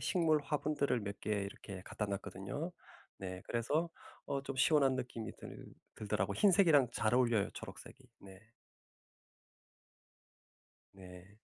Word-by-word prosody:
식물 160 -4 +3
화분들을 145 -3 0
몇 100 -1 -5
개 105 - -4
이렇게 100 -1 -4
갖다 105 - -3
놨거든요. 100 - -4 0.5
네 95 -1 -6
그래서 150 +9 0 0.4
어 140 - -1
좀 135 0 -5
시원한 135 -1 +4
느낌이 125 -3 -4
들 - - -10 0.3
들더라고 105 -2 -1
흰색이랑 170 - +5
잘 110 +2 +1
어울려요 120 -5 +3
초록색이. - - -10 0.2
네. 95 -1 -13 2.5
네. 95 +1 -13
115 Hz, 255 characters per minute, -35 LUFS, 100-145 Hz, 2.5 s, 흰색이랑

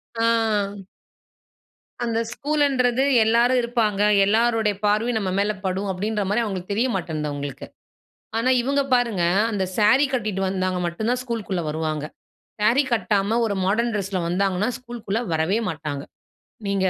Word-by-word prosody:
ஆ. 230 - +1 1.8
அந்த 230 -1 0
ஸ்கூலுன்றது 275 -4 +1 0.2
எல்லோரும் 240 +3 +3
இருப்பாங்க. 230 -4 0 0.2
எல்லோருடைய 225 0 +2
பார்வையும் 220 +3 +1
நம்ம 190 -2 -2
மேல 205 +1 +2
படும், 190 +2 -1
அப்படின்ற 205 +3 -2
மாரி 225 +3 +2
அவங்களுக்கு 195 -1 -4
தெரிய 245 +5 +1
மாட்டேன்து 155 -4 -3
அவங்களுக்கு 145 -1 -6 0.7
ஆனா, 250 +3 +2
இவங்க 280 +2 +1
பாருங்க. 235 -7 +2 0.3
அந்த 200 -4 -1
சாரி 230 +7 +5
கட்டிட்டு 215 -6 -1
வந்தாங்க 185 -1 -1
மட்டும் 175 +6 -3
தான் 250 - +1
ஸ்கூல்குள்ள 225 -7 -3
வருவாங்க. 155 -1 -2 0.6
சாரி 235 +7 +4
கட்டாம 215 -1 +1
ஒரு 205 -3 0
மாடர்ன் 230 +5 +1
டிரெஸ்ல 195 -2 -2
வந்தாங்கனா 190 +4 0
ஸ்கூல்க்குள்ள 235 -4 -4
வரவே 160 +7 +1
மாட்டாங்க. 150 -4 -4 0.7
நீங்க 195 -1 +1
210 Hz, 130 wpm, -23 LUFS, 185-235 Hz, 1.8 s, சாரி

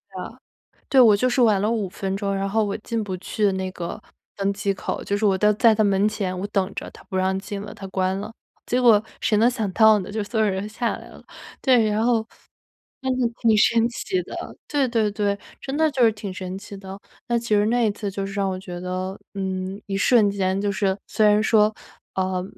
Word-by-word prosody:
的。 - - -7 0.5
对， 270 - +5
我 220 -4 +7
就 250 +5 +1
是 250 +1 +1
晚 210 -5 +4
了 210 - +1
5 215 -4 -1
分 195 +1 -3
钟， 200 -1 -1
然 195 0 -1
后 220 +2 +2
我 200 - -2
进 225 0 -3
不 190 -2 -4
去 205 +2 0
那 190 0 -3
个 175 +4 -6 0.3
登 200 0 0
机 200 0 -1
口， - - -4
就 200 - -1
是 215 - 0
我 195 -2 +3
都 210 +2 +4
在 225 +2 +5
它 215 - +2
门 200 0 +3
前， 190 -4 -3
我 200 - -3
等 195 -1 -1
着， - - -5
它 - - -16
不 190 - -7
让 190 0 +1
进 200 0 -6
了， 210 +1 -8
它 205 -2 -9
关 190 0 -1
了。 210 +2 -6 0.3
结 250 +1 0
果 220 -3 +6 0.2
谁 215 - +2
能 235 +3 +5
想 220 -6 -2
到 220 0 +6
呢， 185 - -7
就 215 0 -2
所 220 +2 -3
有 215 - +3
人 190 0 -2
都 - - -5
下 235 +2 -2
来 - - -12
了。 - - -14 0.4
对， 240 -5 +4
然 215 +1 0
后 230 -2 +2 0.8
真 260 0 0
的 240 - +3
挺 225 -2 +4
神 230 +1 +4
奇 190 -6 -2
的， - - -9 0.3
对 285 -3 +1
对 225 -3 +1
对， 200 -1 -1 0.2
真 270 +1 -4
的 315 0 +3
就 260 -4 +2
是 225 - +6
挺 205 -2 -6
神 185 0 -6
奇 205 0 -10
的。 195 0 -9 0.3
那 235 0 +2
其 235 0 -7
实 210 0 +4
那 235 0 +2
一 - - +2
次 205 0 -4
就 195 0 -4
是 195 - -7
让 200 -1 0
我 185 - -4
觉 180 -2 -7
得， 185 +1 -4 0.2
嗯， 190 0 -3
一 195 -1 -2
瞬 210 -1 +4
间， 190 -1 0
就 205 0 0
是 195 -1 0
虽 215 - +1
然 210 0 +4
说， 215 -1 +4 0.4
呃， 185 -1 -1
205 Hz, 255 characters per minute, -23 LUFS, 195-225 Hz, 0.8 s, 我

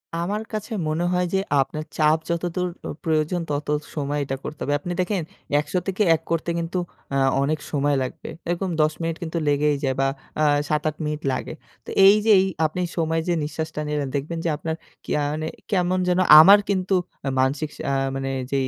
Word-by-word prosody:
আমার 195 +6 -2
কাছে 215 +2 -4 0.2
মনে 155 +3 0
হয় 180 0 +2
যে 190 - +3 0.2
আপনার 155 +3 -3
চাপ 155 0 +4
যতদূর 175 +1 -1 0.2
অ - - -4 0.2
প্রয়োজন 160 +2 +1
তত 145 0 -2 0.3
সময় 145 0 -1
এটা 135 0 -3
করতে 150 - -7
হবে। 145 - 0
আপনি 175 +4 -5
দেখেন, 185 0 -1 0.4
১০০ 150 - -5
থেকে 195 +2 +1
১ 155 - -6
করতে 165 +1 0
কিন্তু 170 +2 -3 0.3
অ্যা 135 - +1 0.2
অনেক 155 +2 0
সময় 145 -1 +1
লাগবে। 130 - -7 0.2
এরকম 175 +2 -1
১০ 155 0 +2
মিনিট 165 0 -1
কিন্তু 170 +1 -4
লেগেই 145 0 +2
যায় 130 -2 +1
বা 135 - +3 0.3
আ - - +4 0.3
৭-৮ 155 0 0
মিনিট 150 0 -3
লাগে। 130 - -4 0.3
তো - - -9 0.2
এই 200 +2 +9
যে 220 - +5
এই 190 - +3 0.2
আপনি 170 +4 -2 0.2
সময় 165 0 +1
যে 175 - +2
নিঃশ্বাসটা 155 +1 -4
নিলেন, 150 -2 -1
দেখবেন 155 +4 -3
যে - - +2
আপনার 160 +1 -3 0.3
কিয়া 150 - 0
মানে 155 +1 -3 0.2
কেমন 185 -1 +2
যেন 180 +1 +2 0.2
আমার 195 +6 +9
কিন্তু 190 -1 +1 0.4
মানসিক 140 +4 +1
সা - - -9
অ্যা 140 - +1 0.2
মানে 135 0 -2 0.2
যেই 135 -1 +1
155 Hz, 195 wpm, -23 LUFS, 150-180 Hz, 0.4 s, এই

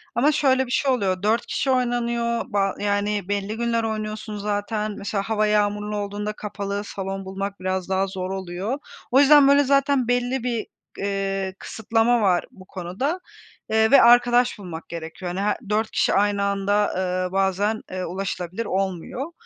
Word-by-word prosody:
ama 275 +6 +4
şöyle 265 -3 +2
bir 245 - -9
şey 270 +1 +2
oluyor, 195 -6 0
4 225 +3 +2
kişi 270 - -1
oynanıyor 235 -2 0
ba 195 -2 0
yani, 205 -1 0
belli 205 +1 -2
günler 235 -1 0
oynuyorsun 215 -1 -4
zaten 210 +1 -2
mesela 200 0 -2
hava 215 0 +1
yağmurlu 210 0 0
olduğunda 205 +1 -3
kapalı 205 -1 -4
salon 195 -1 -5
bulmak 195 +1 -5
biraz 185 0 -2
daha 190 0 +1
zor 185 -1 -4
oluyor. 190 +6 -3 0.3
O 265 - +6
yüzden 285 0 +7
böyle 280 +1 +6
zaten 275 -2 +2
belli 245 +1 0
bir, 235 -3 -1 0.3
eee, 195 -1 -2
kısıtlama 225 +2 +1
var 185 -4 +2
bu 185 - -15
konuda, 185 +8 -3 0.6
ııı, 220 0 +4
ve 280 - +8
arkadaş 245 0 +5
bulmak 175 -4 -8
gerekiyor. 170 +2 -6
Hani, 185 - -3
her 210 +1 +1
4 215 +1 0
kişi - - +2
aynı 205 0 +2
anda, 200 +1 +1
ııı, 185 0 -1
bazen, 195 +3 +1
eee, 185 0 -3
ulaşılabilir 185 +3 -4
olmuyor. 195 - -3
205 Hz, 160 wpm, -23 LUFS, 195-235 Hz, 0.6 s, ve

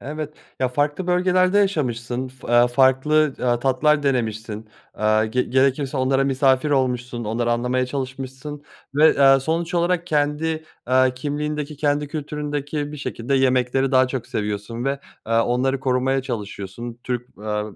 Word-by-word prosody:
Evet. 150 +1 -6 0.3
Ya, 130 - +2
farklı 145 +7 -1
bölgelerde 185 +2 +3
yaşamışsın 130 - -1
fı 130 +1 -14
eee, 120 +1 +5
farklı, 135 +4 +3
aaa, 120 -1 +2
tatlar 140 +4 +2
denemişsin. 110 -5 -2 0.3
Aaa, 110 0 +2
ge 125 +4 0
gerekirse 135 +2 +1
onlara 135 +1 +2
misafir 135 +1 +2
olmuşsun 125 -3 -1
onları 120 +2 0
anlamaya 125 +2 0
çalışmışsın 135 +2 -6 0.3
ve, 150 -1 +5
aaa, 135 0 +7
sonuç 165 +5 -2
olarak 175 0 +1
kendi, 155 +1 0 0.2
aaa, 130 +1 +4
kimliğindeki 150 +3 -4
kendi 145 0 0
kültüründeki 145 0 -4
bir - - -6
şekilde 135 -2 -3
yemekleri 130 0 +2
daha 130 -1 +4
çok 130 -2 -4
seviyorsun 105 +3 -4
ve, 135 0 -1 0.2
aaa, 115 +1 +2
onları 130 +2 0
korumaya 130 0 +1
çalışıyorsun. 115 -1 -6
Türk, 125 -1 -3
eee, 105 0 -2
130 Hz, 140 wpm, -22 LUFS, 125-150 Hz, 0.3 s, aaa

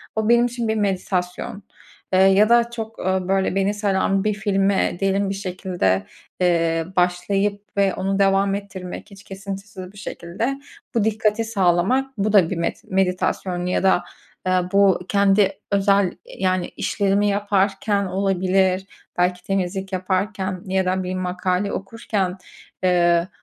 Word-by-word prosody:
O, 220 0 0
benim 235 0 +5
için 240 -1 -3
bir 220 - 0
meditasyon. 190 -1 -2 0.5
Eee, 185 - +5
ya 195 +3 +5
da 235 0 +4
çok, 225 -1 -6
ooo, 185 -1 -1
böyle 195 -1 +1
beni 195 +1 +1
saran 195 -1 +1
bir 215 0 +1
filme 195 -3 +1
diyelim, 195 0 +1
bir 195 - -2
şekilde, 180 - -1 0.4
eee, 165 -2 +2
başlayıp 195 +3 0
ve 195 -1 +3
onu 195 +1 -1
devam 195 0 +3
ettirmek, 200 0 -7
hiç 200 0 -13
kesintisiz 195 0 -8
bir - - -16
şekilde 210 +7 -4 0.4
bu 230 - +3
dikkati 220 +1 +1
sağlamak. 220 +6 +1
Bu 210 +1 0
da 185 -5 +5
bir 185 - -3
met 170 - -3
meditasyon 185 -1 -1
ya 180 - 0
da, 190 -2 +3 0.4
eee, 185 0 +3
bu 195 -2 +4
kendi 200 -1 +4 0.2
özel, 200 -1 +3 0.3
yani, 185 -1 +1
işlerimi 200 0 0
yaparken 200 0 +1
olabilir, 190 0 +1 0.3
belki 180 0 +1
temizlik 190 0 -2
yaparken 185 0 -2
ya 190 0 0
da 185 +1 0
bir 185 0 -3
makale 185 +1 -1
okurken, 195 -2 -3 0.5
eee, 175 -1 +3
195 Hz, 140 wpm, -22 LUFS, 185-205 Hz, 0.5 s, benim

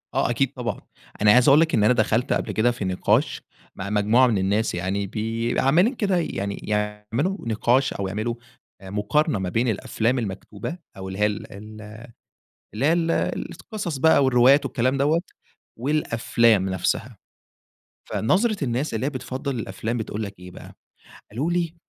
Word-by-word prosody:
آه - - +1
أكيد 130 +3 0
طبعًا. 125 -3 -4 0.4
أنا 105 0 +6
عايز 125 +4 +5
أقول 140 +2 +7
لك، 165 0 +2
إن 110 - +3
أنا 110 - +5
دخلت 115 +1 +1
قبل - - -2
كده 120 +3 +2
في 115 -4 -5
نقاش 95 -1 +1 0.3
مع 95 +1 -5
مجموعة 105 +5 +4
من 115 -4 +1
الناس 100 +3 0
يعني 95 +3 -2
بي 115 +3 -2
عمّالين 175 - +3
كده 195 -5 +1
يعني 100 - -2
يعملوا 105 - -2
نقاش 120 +4 +2
أو 100 - -3
يعملوا 110 +5 -2 0.5
آآ 95 - -10
مقارنة 105 - 0
ما 95 -1 -2
بين 115 +7 0
الأفلام 115 +3 0
المكتوبة 105 - -6 0.2
أو 95 0 -7
اللي 95 +1 -6
هي 105 - +4
ال 105 0 -3
ال 110 +2 -10 0.9
اللي 120 +7 0
هي 160 - +4
ال 165 -1 +1 0.4
القصص 195 - -5
بقى 140 0 +5
والروايات 130 +2 +5
والكلام 130 +2 0
دوّة 150 +4 +2 0.6
والأفلام 115 -6 +2
نفسها. 100 +5 -2 0.9
فنظرة 190 - +1
الناس 130 +3 -1
اللي 110 +3 -1
هي - - +1
بتفضّل 130 0 -4
الأفلام 110 +3 -4
بتقول 110 -1 -4
لك 100 -3 -8
إيه 90 0 -11
بقى، - - -12 0.6
قالوا 135 +11 -2
لي 170 -2 -1
115 Hz, 165 wpm, -23 LUFS, 105-135 Hz, 0.9 s, أقول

